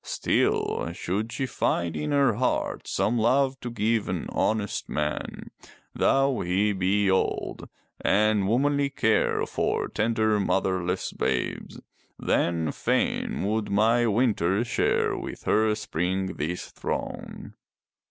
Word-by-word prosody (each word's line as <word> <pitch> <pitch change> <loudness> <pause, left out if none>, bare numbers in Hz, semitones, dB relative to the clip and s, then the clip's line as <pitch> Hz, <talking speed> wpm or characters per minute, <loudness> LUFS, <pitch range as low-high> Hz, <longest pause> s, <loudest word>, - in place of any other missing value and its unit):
Still, - - 0
should 100 +6 -3
she 135 - -2
find 85 -9 -1
in 75 -1 -2
her 140 -4 +3
heart 125 +5 -1
some 120 +2 0
love 130 +3 +2
to 120 - -5
give 115 -1 0
an 90 -3 -2
honest 110 -2 -1
man, 75 0 -3 0.4
though 135 -1 +2
he 95 +4 +1
be 100 +2 +1
old, 95 0 -1 0.3
and 105 -1 +3
womanly 140 +5 +2
care 115 -5 +1
for - - -1
tender 110 -1 +1
motherless 95 -2 0
babes, - - -2 0.4
then 80 -3 0
fain - - -1
would 105 +1 -1
my 115 +4 +3
winter 105 -3 +2
share 120 - +1
with - - -7
her 110 0 +2
spring 95 -1 -2
this 85 +4 -4
throne." - - -5
105 Hz, 120 wpm, -26 LUFS, 95-115 Hz, 0.4 s, her